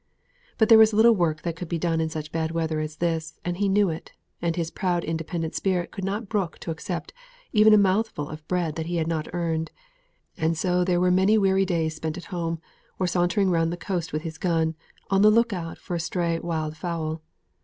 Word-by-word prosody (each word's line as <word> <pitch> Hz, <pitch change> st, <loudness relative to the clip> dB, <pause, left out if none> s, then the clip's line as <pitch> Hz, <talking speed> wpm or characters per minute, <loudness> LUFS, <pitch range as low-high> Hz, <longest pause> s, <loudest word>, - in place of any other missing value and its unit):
But 220 Hz, -, +4 dB
there 225 Hz, 0 st, +8 dB
was 220 Hz, 0 st, +6 dB
little 225 Hz, +2 st, +6 dB
work 165 Hz, -6 st, 0 dB
that 170 Hz, -2 st, -2 dB
could 165 Hz, 0 st, -7 dB
be 170 Hz, -, -1 dB
done 165 Hz, -1 st, 0 dB
in 160 Hz, -, 0 dB
such 155 Hz, -1 st, -6 dB
bad 160 Hz, -1 st, -1 dB
weather 160 Hz, -1 st, -1 dB
as 155 Hz, 0 st, -4 dB
this, 160 Hz, -1 st, -2 dB
and 175 Hz, 0 st, -2 dB
he 200 Hz, 0 st, +1 dB
knew 200 Hz, -2 st, +3 dB
it, 160 Hz, -, -8 dB, 0.3 s
and 170 Hz, -1 st, 0 dB
his 165 Hz, -2 st, -2 dB
proud, 180 Hz, -3 st, -1 dB
independent 160 Hz, 0 st, -3 dB
spirit 185 Hz, -3 st, -1 dB
could 195 Hz, -, -6 dB
not 200 Hz, +3 st, -2 dB
brook 190 Hz, -5 st, -2 dB
to 165 Hz, -, -4 dB
accept 160 Hz, -, -5 dB, 0.4 s
even 215 Hz, -1 st, +6 dB
a 215 Hz, -, +8 dB
mouthful 195 Hz, -6 st, +1 dB
of 155 Hz, +1 st, -9 dB
bread 175 Hz, -4 st, 0 dB
that 160 Hz, 0 st, -3 dB
he 175 Hz, -, -2 dB
had 165 Hz, -2 st, +1 dB
not 160 Hz, -2 st, -2 dB
earned; 165 Hz, -2 st, -1 dB, 0.7 s
and 160 Hz, +1 st, 0 dB
so 180 Hz, +1 st, +1 dB
there 175 Hz, -1 st, +1 dB
were 180 Hz, 0 st, +3 dB
many 190 Hz, +4 st, +4 dB
weary 195 Hz, -1 st, +3 dB
days 160 Hz, -4 st, -1 dB
spent 160 Hz, 0 st, -4 dB
at 180 Hz, -, -8 dB
home, 165 Hz, -2 st, -2 dB, 0.4 s
or 185 Hz, -, 0 dB
sauntering 180 Hz, +2 st, +2 dB
round 165 Hz, -1 st, +2 dB
the 175 Hz, -, -4 dB
coast 175 Hz, -2 st, -3 dB
with 155 Hz, +1 st, -3 dB
his 160 Hz, -1 st, -6 dB
gun, 165 Hz, -3 st, +1 dB, 0.4 s
on 195 Hz, 0 st, +4 dB
the 210 Hz, -, +8 dB
look 230 Hz, +1 st, +3 dB
out 165 Hz, -3 st, -5 dB
for -, -, -7 dB
a 170 Hz, -, 0 dB
stray 170 Hz, 0 st, -1 dB
wild 160 Hz, -2 st, -3 dB
fowl. 160 Hz, -1 st, -3 dB
170 Hz, 225 wpm, -25 LUFS, 160-190 Hz, 0.7 s, there